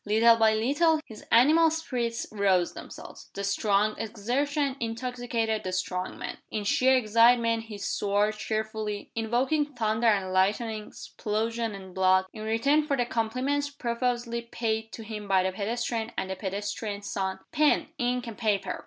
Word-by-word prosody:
Little 225 Hz, +3 st, +5 dB
by 220 Hz, -1 st, +4 dB
little 290 Hz, +8 st, +2 dB
his 215 Hz, -2 st, -12 dB
animal 310 Hz, +8 st, +6 dB
spirits 250 Hz, -8 st, -2 dB
roused 195 Hz, -4 st, +2 dB
themselves. -, -, -11 dB
The 200 Hz, -, -4 dB
strong 200 Hz, +1 st, +2 dB
exertion 260 Hz, +6 st, -1 dB
intoxicated 230 Hz, -2 st, -2 dB
the 185 Hz, -, -3 dB
strong 185 Hz, 0 st, -3 dB
man. -, -, -6 dB
In 215 Hz, -1 st, -3 dB
sheer 260 Hz, +6 st, +4 dB
excitement 230 Hz, 0 st, +4 dB
he 215 Hz, -2 st, -8 dB
swore 205 Hz, +1 st, 0 dB
cheerfully 215 Hz, -1 st, -4 dB
invoking 260 Hz, +6 st, 0 dB
thunder 220 Hz, 0 st, +1 dB
and 195 Hz, -4 st, +2 dB
lightning, 210 Hz, +3 st, +1 dB
explosion 225 Hz, +1 st, -3 dB
and 190 Hz, -2 st, -10 dB
blood, 185 Hz, 0 st, +3 dB
in 215 Hz, -, -8 dB
return 280 Hz, +8 st, +2 dB
for 280 Hz, -2 st, +1 dB
the 245 Hz, -, +1 dB
compliments 255 Hz, +5 st, -1 dB
profusely 240 Hz, -2 st, -2 dB
paid 225 Hz, -1 st, -3 dB
to 225 Hz, -, -7 dB
him 210 Hz, -2 st, -7 dB
by 190 Hz, -1 st, +3 dB
the 190 Hz, -, 0 dB
pedestrian 225 Hz, +3 st, -2 dB
and 190 Hz, -, -2 dB
the -, -, -2 dB
pedestrian's 200 Hz, +1 st, -4 dB
son. 190 Hz, -1 st, -2 dB
"Pen, 300 Hz, 0 st, +2 dB
ink, 245 Hz, 0 st, 0 dB
and 230 Hz, -3 st, -8 dB
paper!" 200 Hz, -5 st, 0 dB
225 Hz, 155 wpm, -27 LUFS, 205-245 Hz, -, animal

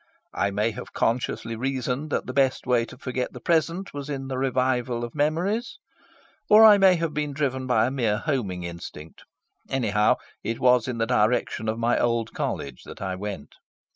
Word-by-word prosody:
I 100 Hz, -, 0 dB
may 105 Hz, +3 st, 0 dB
have 105 Hz, -, -9 dB
consciously 115 Hz, -1 st, -1 dB
reasoned 130 Hz, +3 st, -2 dB
that -, -, -1 dB
the 130 Hz, -, -5 dB
best 135 Hz, -1 st, +1 dB
way 120 Hz, -2 st, +2 dB
to 125 Hz, -, -13 dB
forget 130 Hz, -1 st, -3 dB
the -, -, -8 dB
present 170 Hz, +3 st, 0 dB
was 145 Hz, 0 st, -6 dB
in 135 Hz, -2 st, -4 dB
the 130 Hz, -, -3 dB
revival 125 Hz, -2 st, 0 dB
of 120 Hz, -, -5 dB
memories. 175 Hz, +10 st, -1 dB, 0.7 s
Or 215 Hz, +1 st, +9 dB
I 210 Hz, -2 st, +8 dB
may 190 Hz, -2 st, +6 dB
have 165 Hz, -2 st, -2 dB
been 150 Hz, -1 st, -2 dB
driven 130 Hz, -3 st, -2 dB
by 115 Hz, -3 st, +3 dB
a 130 Hz, -, -1 dB
mere 115 Hz, -6 st, 0 dB
homing 110 Hz, -, -2 dB
instinct. 85 Hz, -2 st, -9 dB, 0.4 s
Anyhow, 105 Hz, -5 st, +2 dB, 0.3 s
it 115 Hz, +2 st, -3 dB
was 125 Hz, -2 st, +4 dB
in 125 Hz, -2 st, -3 dB
the 115 Hz, -, +1 dB
direction 110 Hz, -1 st, +1 dB
of 110 Hz, -, -2 dB
my 115 Hz, +1 st, +1 dB
old 115 Hz, -2 st, 0 dB
College 70 Hz, -3 st, -4 dB
that -, -, -10 dB
I 95 Hz, -1 st, -3 dB
went. 100 Hz, +1 st, -6 dB
125 Hz, 185 wpm, -25 LUFS, 115-140 Hz, 0.7 s, Or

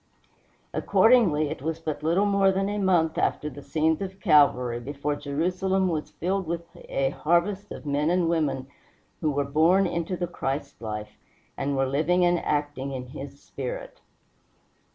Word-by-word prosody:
Accordingly, 185 Hz, -, +4 dB
it -, -, -6 dB
was 160 Hz, +2 st, -2 dB
but 155 Hz, -2 st, -4 dB
little 170 Hz, +6 st, +2 dB
more 200 Hz, -1 st, +4 dB
than 195 Hz, +1 st, 0 dB
a 205 Hz, 0 st, -2 dB
month 175 Hz, -5 st, +2 dB
after 150 Hz, -, 0 dB
the 145 Hz, +2 st, -10 dB
scenes 160 Hz, +4 st, 0 dB
of 190 Hz, 0 st, -5 dB
Calvary 125 Hz, -5 st, +4 dB
before 145 Hz, +3 st, -3 dB
Jerusalem 185 Hz, +7 st, 0 dB
was 155 Hz, -3 st, -2 dB
filled 190 Hz, +1 st, -2 dB
with 170 Hz, 0 st, -2 dB
a 135 Hz, -1 st, -2 dB
harvest 185 Hz, +7 st, 0 dB
of -, -, -8 dB
men 145 Hz, +2 st, +1 dB
and 175 Hz, -1 st, +2 dB
women 155 Hz, -6 st, 0 dB, 0.5 s
who 155 Hz, -, 0 dB
were 145 Hz, 0 st, 0 dB
born 165 Hz, +7 st, +4 dB
into 170 Hz, +1 st, -2 dB
the 175 Hz, -, -1 dB
Christ 140 Hz, -7 st, -4 dB
life, 105 Hz, -1 st, -6 dB, 0.4 s
and 140 Hz, 0 st, -2 dB
were 135 Hz, -, +2 dB
living 160 Hz, +7 st, +2 dB
and 175 Hz, 0 st, +3 dB
acting 145 Hz, -2 st, -2 dB
in 125 Hz, -1 st, -6 dB
his 140 Hz, 0 st, -9 dB
spirit. 130 Hz, -2 st, -6 dB
155 Hz, 160 wpm, -26 LUFS, 140-180 Hz, 0.5 s, Accordingly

